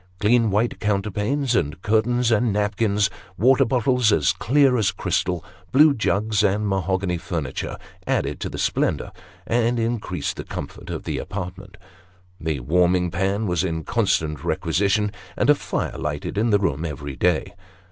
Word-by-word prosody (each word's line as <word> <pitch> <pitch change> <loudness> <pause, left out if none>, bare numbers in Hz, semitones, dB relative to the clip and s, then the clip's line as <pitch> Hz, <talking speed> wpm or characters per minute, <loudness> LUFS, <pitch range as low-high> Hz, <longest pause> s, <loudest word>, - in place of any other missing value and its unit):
Clean 115 +2 +3
white 105 +4 0
counterpanes, 105 +6 0
and 75 +3 0
curtains, 120 +3 +2
and 115 +1 +2
napkins, 105 0 +1 0.3
water 130 +6 +4
bottles 125 -1 +2
as 75 -10 +3
clear 130 +5 +3
as 110 -5 +2
crystal, 90 -2 -1 0.3
blue 150 +2 +6
jugs, 105 -3 +1
and 105 +1 +1
mahogany 95 -2 0
furniture, 80 -7 -4 0.3
added - - 0
to - - -3
the - - -7
splendour, - - 0 0.3
and 120 +1 +1
increased 115 -1 -2
the - - -5
comfort, - - -7
of - - -4
tho - - -3
apartment. 95 0 -7 0.6
The 80 -4 -2
warming 90 +5 +2
pan 95 +5 0
was 90 -3 0
in 80 -3 -2
constant 75 0 0
requisition, 105 +2 +1 0.3
and 130 - +4
a - - +8
fire - - -3
lighted 75 +5 -3
in 110 +3 +1
the 105 - +5
room 85 -7 -1
every 70 -3 -5
day. 90 +1 +1
100 Hz, 150 wpm, -23 LUFS, 90-115 Hz, 0.6 s, a